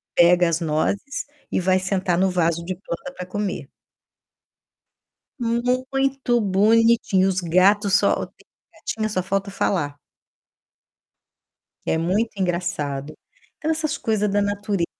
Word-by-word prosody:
pega 175 +1 +5
as 165 0 0
nozes 165 - -1 0.3
e - - +1
vai 185 +1 +2
sentar 185 -1 0
no 190 0 +3
vaso 170 -2 0
de 185 +1 -3
planta 190 +7 -7
pra 180 - -5
comer. 195 +1 -4 1.7
Muito 255 +2 0
bonitinho 215 -1 +3
os 190 -1 0
gatos 195 +4 +3
só - - +3
ó, - - -1
tem - - -32
uma - - -27
gatinha 215 -1 -2
só 185 -3 -1
falta 195 +1 -1
falar. 145 -7 -1 1.9
Que - - +1
muito 190 +8 0
engraçado. 160 -6 -2 0.4
Então, 310 - -3
essas 310 -2 -1
coisa 215 -2 0
da 205 0 +1
natureza, 205 -2 -1
195 Hz, 130 wpm, -22 LUFS, 175-220 Hz, 1.9 s, pega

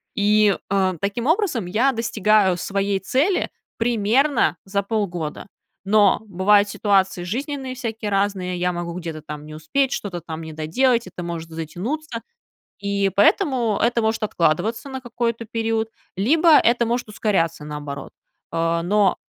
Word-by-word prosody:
И, 210 -1 +4
а, 190 -1 +1
таким 205 +4 -2
образом 325 - +1
я 235 +9 +2
достигаю 215 -4 +2
своей 195 +1 -1
цели 280 - +1 0.3
примерно 235 +4 +2
за 200 +1 -1
полгода, 190 -8 -3 0.4
но 205 0 +4
бывают 205 +2 +4
ситуации 190 -4 +1
жизненные 265 - -4
всякие 225 -3 -4
разные, 195 -2 0
я 180 0 0
могу 170 0 -4
где-то 165 -3 -6
там 150 0 -8
не 155 - -10
успеть, 260 - 0
что-то 185 -4 -4
там 160 0 -7
не 160 - -7
доделать, 230 +10 +1
это 180 -1 -7
может 165 -1 -5
затянуться. 220 - -5 0.6
И 200 -1 0
поэтому 230 +1 +3
это 235 0 +2
может 220 +1 0
откладываться 210 - 0
на 265 0 -5
какой-то 235 -2 -3
период, 225 0 -1 0.3
либо 310 - +4
это 235 0 +3
может 240 0 -1
ускоряться 185 -8 0
наоборот. 145 -2 -7 0.4
А, 165 0 0
но 195 +2 +3
205 Hz, 140 wpm, -22 LUFS, 175-235 Hz, 0.6 s, И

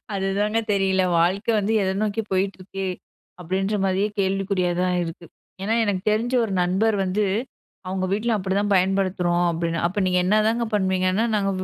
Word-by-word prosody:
அதுதாங்க 200 +3 0
தெரியல. 190 -1 +2 0.2
வாழ்க்க 185 +6 +1
வந்து 210 +2 0
எத 190 0 0
நோக்கி 215 +1 -1
போயிட்டு 190 +1 0
இருக்கு. 195 +1 -5 0.5
அப்பிடின்றமாரியே 195 +2 0
கேள்விக்குறியா 190 -1 0
தான் 180 0 +1
இருக்கு. 170 +1 -8 0.4
ஏன்னா 220 +3 0
எனக்கு 195 -3 -1
தெரிஞ்ச 230 +4 0
ஒரு 205 - -4
நண்பர் 205 +4 +1
வந்து 195 +3 0 0.6
அவுங்க 185 0 -2
வீட்ல 225 +3 0
அப்பிடி 190 -1 -2
தான் 205 0 0
பயன்படுத்துறோம் 185 -2 +1
அப்பிடின்னு. 170 0 -2
அப்ப 200 +3 -3
நீங்க 180 0 +2
என்னதாங்க 215 +4 +2
பண்ணுவீங்கன்னா, 190 +1 +1
நாங்க 195 -1 0
195 Hz, 150 wpm, -23 LUFS, 185-205 Hz, 0.6 s, தெரியல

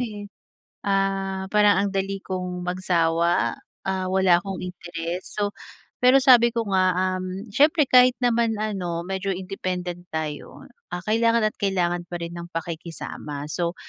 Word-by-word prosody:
eh, 210 -4 -5 0.6
ah, 195 -1 0
parang 205 -2 +5
ang - - -2
dali 195 0 -2
kong 180 -1 -4
magsawa, 170 -2 +1 0.3
ah, 190 -1 -1
wala 190 -2 +5
akong 195 0 -6
interes, 175 -1 -5
so 205 -1 0 0.5
pero 255 +2 +7
sabi 245 -3 +6
ko 230 -1 -2
nga, 185 -1 +3 0.2
um, 185 +3 -5
siyempre 300 +1 +4
kahit 250 0 +6
naman 235 -2 +2
ano 180 -6 -2
medyo 195 0 -2
independent 180 -2 -4
tayo, 155 -2 -5 0.2
ah, 175 - -3
kailangan 230 +2 +3
at - - -13
kailangan 175 -3 0
pa 175 -1 -5
rin 170 0 -5
ng 170 0 -7
pakikisama 165 -3 -6
so, 170 +2 -2
190 Hz, 145 wpm, -24 LUFS, 175-205 Hz, 0.6 s, pero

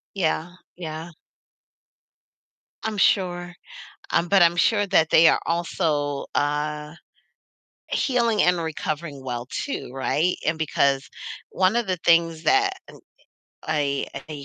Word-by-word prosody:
Yeah, 175 -1 -1 0.2
yeah. 160 0 -6 1.7
I'm 220 -1 -2
sure. 175 -3 +1 0.6
Um, 170 - +2
but 195 -1 +4
I'm 170 0 +5
sure 205 +3 +3
that 160 -4 +3
they 165 +1 +6
are - - +4
also, 155 -4 -1
uh, 150 +1 -1 1.0
healing 235 -6 +1
and 180 0 +3
recovering 155 -3 -4
well 120 -1 -5
too, 275 - -4
right? 155 +6 0
And 160 +1 +1
because 140 -3 +1 0.4
one 185 +3 +2
of 235 -2 +1
the 185 - -1
things 165 -1 +2
that 395 - +3 0.2
n - - -13 0.7
I 145 -3 -1 0.2
a 145 -3 -7
165 Hz, 120 wpm, -24 LUFS, 150-180 Hz, 1.7 s, they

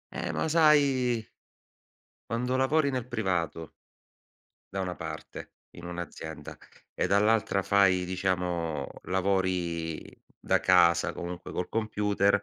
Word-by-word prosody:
Eh - - -3
ma - - -1
sai 140 -7 +3 1.1
quando 125 +2 -1
lavori 140 +3 +2
nel 130 -3 -2
privato 95 -9 -2 1.0
da 95 - -2
una 90 -1 -3
parte, 80 -1 -8 0.3
in 85 - -9
un'azienda, 85 -2 -7 0.4
e - - 0
dall'altra 105 0 +2
fai, 95 -2 +3
diciamo, 90 -5 -1 0.2
lavori 90 -4 -1 0.4
da - - +2
casa 90 -3 +4
comunque 90 0 -6
col 90 - -3
computer, 105 -2 +1
95 Hz, 105 wpm, -28 LUFS, 85-115 Hz, 1.1 s, casa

